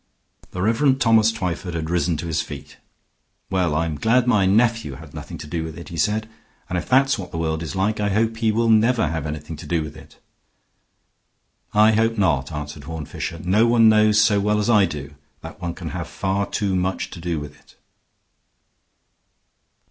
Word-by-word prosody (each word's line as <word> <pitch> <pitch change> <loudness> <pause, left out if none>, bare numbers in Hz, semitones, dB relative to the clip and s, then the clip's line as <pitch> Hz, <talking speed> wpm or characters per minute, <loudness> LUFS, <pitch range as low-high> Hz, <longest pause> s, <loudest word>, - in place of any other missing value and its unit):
The 90 - -4
Rev. 130 +5 +3
Thomas 115 -3 +4
Twyford 90 -4 -4
had 80 0 -3
risen 85 -2 +1
to 80 - -5
his 80 -2 -1
feet. 75 0 -9 0.7
"Well, 90 -5 +1
I'm 80 -2 -1
glad 120 +5 +3
my 105 -6 +3
nephew 115 - +2
had 75 0 -13
nothing - - -8
to - - -8
do 80 +2 -3
with 80 0 -7
it," 85 -4 -9
he 85 - -7
said. 110 +4 0 0.4
"And 90 - -1
if - - -9
that's 135 -1 +3
what 90 -3 -6
the - - -6
world 80 -1 -1
is 85 +3 -5
like, 100 +3 0
I 105 -1 0
hope 110 +3 0
he 115 -1 +1
will 115 +2 +1
never 110 -2 +3
have 80 -1 -3
anything 75 +1 -6
to - - -10
do 85 -2 0
with 75 0 -8
it." 80 - -15 1.5
"I 105 +1 +5
hope 115 +1 +1
not," 75 -8 +1
answered 75 -1 -7
Horne 80 -1 -6
Fisher. 85 +3 -6
"No 105 +6 +3
one 115 -1 +5
knows 105 0 +4
so 105 -1 +4
well 105 +1 +1
as 105 +3 +1
I 105 -3 +5
do 75 -4 -7 0.3
that - - -10
one 85 -1 -4
can - - -6
have - - -5
far 100 +1 -2
too 100 -3 -1
much 95 +1 -2
to - - -9
do 85 -2 -2
with 75 0 -9
it." 75 - -23
95 Hz, 200 wpm, -22 LUFS, 80-110 Hz, 1.5 s, I